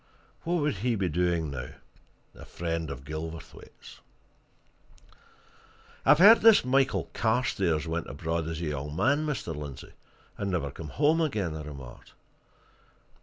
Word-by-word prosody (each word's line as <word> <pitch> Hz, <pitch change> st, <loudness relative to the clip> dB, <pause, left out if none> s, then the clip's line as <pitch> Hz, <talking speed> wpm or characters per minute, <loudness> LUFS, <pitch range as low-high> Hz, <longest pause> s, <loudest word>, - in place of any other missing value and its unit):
What 170 Hz, +2 st, 0 dB
would 145 Hz, -5 st, 0 dB
he 120 Hz, +4 st, 0 dB
be 95 Hz, -4 st, -1 dB
doing 85 Hz, -2 st, 0 dB
now, 65 Hz, -3 st, -6 dB, 0.6 s
a -, -, -13 dB
friend 80 Hz, -2 st, -4 dB
of 70 Hz, -1 st, -8 dB
Gilverthwaite's?" 80 Hz, +2 st, -9 dB, 2.0 s
"I've 150 Hz, +2 st, +6 dB
heard 210 Hz, +7 st, +9 dB
that -, -, -12 dB
this 225 Hz, -2 st, +8 dB
Mr. 125 Hz, -, -4 dB
Michael 135 Hz, -1 st, +2 dB
Carstairs 100 Hz, -9 st, 0 dB
went 80 Hz, 0 st, -3 dB
abroad 80 Hz, +3 st, -3 dB
as 80 Hz, 0 st, -4 dB
a -, -, -2 dB
young 75 Hz, 0 st, -4 dB
man, 145 Hz, -, +2 dB
Mr. 145 Hz, -, -3 dB
Lindsey, 75 Hz, -3 st, -8 dB, 0.5 s
and 100 Hz, -, -2 dB
never 80 Hz, -7 st, -2 dB
came 80 Hz, +2 st, -8 dB
home 155 Hz, -, +2 dB
again," 105 Hz, -, -1 dB
I 80 Hz, -, -6 dB
remarked. 70 Hz, -5 st, -11 dB
85 Hz, 145 wpm, -28 LUFS, 75-125 Hz, 2.0 s, heard